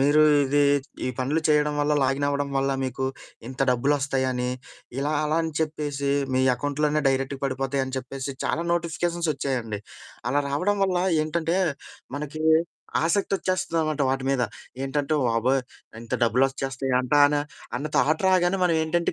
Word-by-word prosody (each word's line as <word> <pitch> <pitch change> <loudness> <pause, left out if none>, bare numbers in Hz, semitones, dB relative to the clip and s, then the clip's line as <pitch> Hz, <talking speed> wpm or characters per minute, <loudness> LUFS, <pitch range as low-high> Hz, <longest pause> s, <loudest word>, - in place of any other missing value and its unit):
మీరు 145 +3 +5 0.2
ఇదీ 145 +2 +2 0.5
ఈ - - 0
పనులు 140 +5 0
చెయ్యడం 150 -1 +3
వల్ల, 145 +1 +1
లాగినవ్వడం 140 +1 0
వల్ల, 135 0 +1
మీకు 130 +1 -3 0.4
ఇంత 130 +1 -9
డబ్బులొస్తాయని, 130 -1 0 0.5
ఇలా 145 +2 0
అలా 155 +1 0
అని 160 - -3
చెప్పేసి, 145 -3 -2 0.2
మీ 130 - +3
ఎకౌంట్‌లోనే 145 +3 0
డైరెక్ట్‌గా 135 0 -1
పడిపోతాయని 135 0 -1
చెప్పేసి, 135 +1 -5
చాలా 170 - -1
నోటిఫికేషన్సొచ్చాయండి. 160 -9 -1 0.5
అలా 145 +2 +2
రావడం 190 +9 +1
వల్ల 185 -2 +1 0.2
ఏంటంటే, 165 +2 -1 0.6
మనకీ 150 +2 -5 0.6
ఆసక్తొచ్చేస్తదనమాట 170 -4 0
వాటి 135 0 -1
మీద. 135 -2 +1 0.4
ఏంటంటే, 145 +2 -1
వాబోయ్! 120 +3 +2 0.4
ఇంత 115 - -11
డబ్బులొచ్చేస్తాయంటాన 135 +3 +2 0.4
అన్న 140 +5 -3
థాట్ 155 +7 +2
రాగానే, 185 0 +3
మనవేంటంటే 165 0 +1
145 Hz, 120 wpm, -25 LUFS, 135-155 Hz, 0.6 s, మీరు